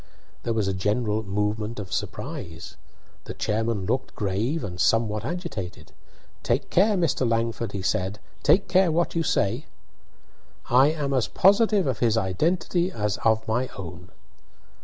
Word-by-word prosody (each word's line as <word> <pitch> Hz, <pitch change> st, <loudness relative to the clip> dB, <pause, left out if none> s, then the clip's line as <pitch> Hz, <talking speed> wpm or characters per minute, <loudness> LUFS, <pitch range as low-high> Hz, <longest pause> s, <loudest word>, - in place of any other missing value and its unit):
There 115 Hz, -, -1 dB
was 105 Hz, -3 st, +1 dB
a 95 Hz, -, 0 dB
general 105 Hz, +3 st, 0 dB
movement 105 Hz, +2 st, -2 dB
of 95 Hz, -4 st, -6 dB
surprise. 80 Hz, -1 st, -5 dB, 0.5 s
The -, -, -7 dB
chairman 110 Hz, -2 st, -1 dB
looked 130 Hz, +6 st, -2 dB
grave 110 Hz, +10 st, -1 dB
and 90 Hz, -3 st, -4 dB
somewhat 110 Hz, -1 st, +2 dB
agitated. 110 Hz, -, -5 dB, 0.5 s
"Take -, -, -1 dB
care, 205 Hz, +3 st, +4 dB
Mr. 140 Hz, -8 st, +1 dB
Langford," 115 Hz, 0 st, -1 dB
he 100 Hz, -2 st, -4 dB
said; 95 Hz, +2 st, 0 dB, 0.2 s
"take 195 Hz, -, +4 dB
care 185 Hz, -1 st, +4 dB
what 170 Hz, +2 st, +1 dB
you 165 Hz, -, +1 dB
say." 125 Hz, -2 st, 0 dB, 1.0 s
"I 130 Hz, +3 st, +7 dB
am 150 Hz, -3 st, -1 dB
as 130 Hz, -4 st, +2 dB
positive 205 Hz, 0 st, +4 dB
of 130 Hz, -3 st, -1 dB
his 115 Hz, -2 st, +2 dB
identity 170 Hz, -, 0 dB
as 105 Hz, -, -1 dB
of 110 Hz, 0 st, +1 dB
my 120 Hz, +4 st, 0 dB
own." 90 Hz, -1 st, -8 dB
115 Hz, 145 wpm, -25 LUFS, 100-155 Hz, 1.0 s, I